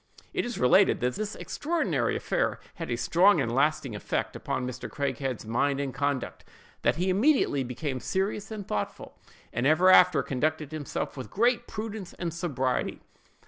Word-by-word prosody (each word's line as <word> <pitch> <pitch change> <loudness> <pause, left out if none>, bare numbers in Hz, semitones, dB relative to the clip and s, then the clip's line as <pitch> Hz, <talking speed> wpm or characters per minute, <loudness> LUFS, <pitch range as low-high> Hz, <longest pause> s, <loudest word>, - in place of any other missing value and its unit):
"It - - 0
is 240 - -4
related 185 +11 +5
that 125 +1 +1
this 215 +5 -4
extraordinary 330 +3 -1
affair - - -1
had - - -6
a - - 0
strong 180 +1 +4
and 115 -4 0
lasting 140 -3 +1
effect 105 - -2
upon 125 - -3
Mr. 125 0 -6
Craighead's 135 -4 -3
mind 135 +5 +1
and 140 -2 -2
conduct; 140 -2 -2 0.4
that 120 - +2
he 180 +4 +1
immediately 205 - +3
became 130 +2 -4
serious 195 - -2
and 210 -3 -6
thoughtful, 105 - -4 0.4
and 120 +3 +1
ever 175 +5 +5
after 180 -1 +6
conducted 150 +2 -1
himself 155 -3 -4
with 130 -2 -7
great 235 +3 +2
prudence 215 -4 -6
and 170 -3 -4
sobriety." 140 -7 -1
155 Hz, 160 wpm, -28 LUFS, 130-195 Hz, 0.4 s, after